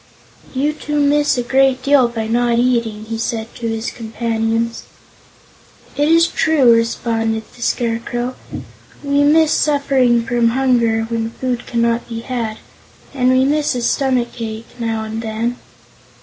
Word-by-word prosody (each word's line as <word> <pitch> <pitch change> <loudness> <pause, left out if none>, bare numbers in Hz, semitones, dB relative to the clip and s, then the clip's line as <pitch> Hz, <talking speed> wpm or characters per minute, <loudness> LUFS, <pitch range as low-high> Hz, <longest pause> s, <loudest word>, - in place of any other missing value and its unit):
"You 290 +3 +1
two 295 -1 -3
miss 290 -1 +2
a 245 - 0
great 265 +1 +2
deal 275 -3 +4
by 230 -2 -4
not 235 +1 +1
eating," 235 -3 0
he 225 0 -5
said 225 -1 -3
to 230 - -5
his 225 +1 -3
companions. 230 0 -2 1.1
"It 290 +1 +1
is 330 +1 +5
true," 295 -8 +3
responded 225 -1 0
the 245 - -15
Scarecrow. 240 +1 -2 0.7
"We 280 0 +1
miss 310 +1 +4
suffering 265 -5 +2
from 240 0 +1
hunger, 235 -4 +2
when 225 -1 -2
food 245 +1 -4
cannot 235 0 0
be 230 -1 -5
had, 230 -3 -4 0.6
and 255 -2 +1
we 260 0 +3
miss 295 -1 +1
a 245 - -2
stomachache, 235 -4 -1
now 225 -1 -2
and 220 +1 -5
then." 230 +2 -3
240 Hz, 140 wpm, -18 LUFS, 230-265 Hz, 1.1 s, is